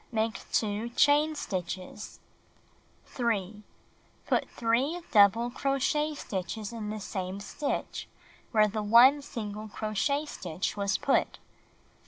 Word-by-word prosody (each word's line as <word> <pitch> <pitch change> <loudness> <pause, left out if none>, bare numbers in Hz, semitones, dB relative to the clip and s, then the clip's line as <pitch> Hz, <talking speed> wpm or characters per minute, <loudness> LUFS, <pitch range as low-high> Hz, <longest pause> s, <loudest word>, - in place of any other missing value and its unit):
Make 225 -1 -2
2 215 +1 0
chain 300 +2 +4
stitches. 185 - -5 0.9
f - - -24
3. 210 -4 -1 0.6
Put - - 0
3 255 +9 0
double 220 +3 +5
crochet 280 +3 0
stitches 205 -1 -5
in 215 -2 -5
the 215 0 -4
same 190 -1 -4
stitch 280 +8 -4 0.4
where 215 -2 +4
the 215 +1 -3
1 240 +7 +6
single 215 -6 -6
crochet 215 +8 -1
stitch 180 - -4
was 200 -2 0
put. 275 - +1
220 Hz, 115 wpm, -29 LUFS, 205-270 Hz, 0.9 s, 1